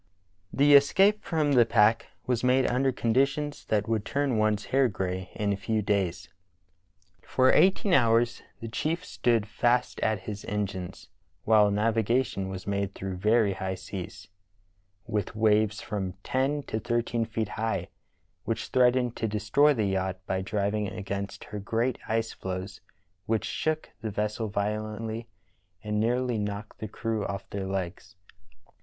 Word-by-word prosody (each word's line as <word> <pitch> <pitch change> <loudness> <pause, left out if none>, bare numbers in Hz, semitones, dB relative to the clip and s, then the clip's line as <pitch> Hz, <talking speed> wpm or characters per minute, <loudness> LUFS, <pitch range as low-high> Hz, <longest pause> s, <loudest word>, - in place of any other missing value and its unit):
The 145 +1 +4
escape 195 +9 +5
from 155 -3 0
the 125 -4 +6
pack 110 0 +3 0.2
was 125 -2 0
made 130 +1 +4
under 130 +2 +2
conditions 135 +5 0
that 105 0 0
would 110 -2 0
turn 135 -2 0
one's 110 -1 +1
hair 135 -1 +5
gray 95 -3 -3
in 105 -1 0
a - - -1
few 105 +2 -1
days. 95 -3 -1 0.9
For 130 0 +3
eighteen 190 0 +4
hours 115 -3 +3 0.2
the 115 - -5
chief 160 +10 -2
stood 115 -3 +1
fast 120 +4 +1
at 110 -2 0
his 105 +1 -6
engines, 95 -3 -4 0.3
while 105 -2 +5
navigation 110 0 +1
was 95 -1 -6
made 100 -1 -2
through 95 -1 -5
very 105 +1 +3
high 95 0 -3
seas, 95 0 -8 0.8
with 105 -4 -2
waves 110 -1 +2
from 95 -3 -3
ten 140 +3 0
to 110 - -3
thirteen 120 0 0
feet 110 -2 -3
high, 110 -6 -2 0.5
which 115 0 -3
threatened 125 -1 +3
to 115 - -1
destroy 110 +8 +3
the 115 -7 +1
yacht 95 -1 -1
by 95 0 -1
driving 105 +1 -1
against 100 0 -5
her 105 - -7
great 115 +5 -1
ice 115 0 -1
floes 95 +1 -6 0.5
which 110 -1 0
shook 155 0 -2
the 110 - -3
vessel 105 +2 -2
violently 110 +2 -3 0.6
and 105 0 -1
nearly 120 +1 +1
knocked 105 +1 -5
the 110 - -4
crew 110 0 -3
off 100 -1 -5
their 100 -1 -3
legs. 95 -1 -4
110 Hz, 150 wpm, -28 LUFS, 100-120 Hz, 0.9 s, the